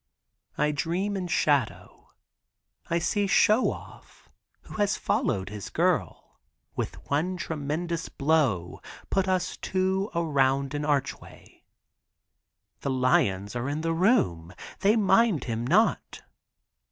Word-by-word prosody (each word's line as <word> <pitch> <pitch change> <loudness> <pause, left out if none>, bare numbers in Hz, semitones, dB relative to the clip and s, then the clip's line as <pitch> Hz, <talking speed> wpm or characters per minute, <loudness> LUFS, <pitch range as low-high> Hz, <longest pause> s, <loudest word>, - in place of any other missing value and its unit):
I 150 +1 +2
dream 175 +7 -2
in 185 -2 -3
shadow. 145 -7 -1 0.8
I 170 - +1
see 200 +4 0
Show 215 +4 +4
Off, - - -13 0.3
who - - -10
has 205 -1 +1
followed 95 -5 -1
his 105 -2 -7
girl, - - -1 0.4
with - - -3 0.2
one 175 +6 0
tremendous 165 +1 -3
blow 135 - 0 0.3
put 195 -1 +1
us 185 -1 -1
two 190 +2 -1
around 140 -4 +1
an 145 0 -2
archway. 145 -3 -4 1.1
The - - -3
lions 115 -6 +1
are 120 +3 -2
in 150 +2 -2
the 165 0 0
room. 90 - +1 0.2
They 205 +3 +3
mind 215 - +3
him 115 0 -3
not. 210 - +1
155 Hz, 115 wpm, -27 LUFS, 130-185 Hz, 1.1 s, Show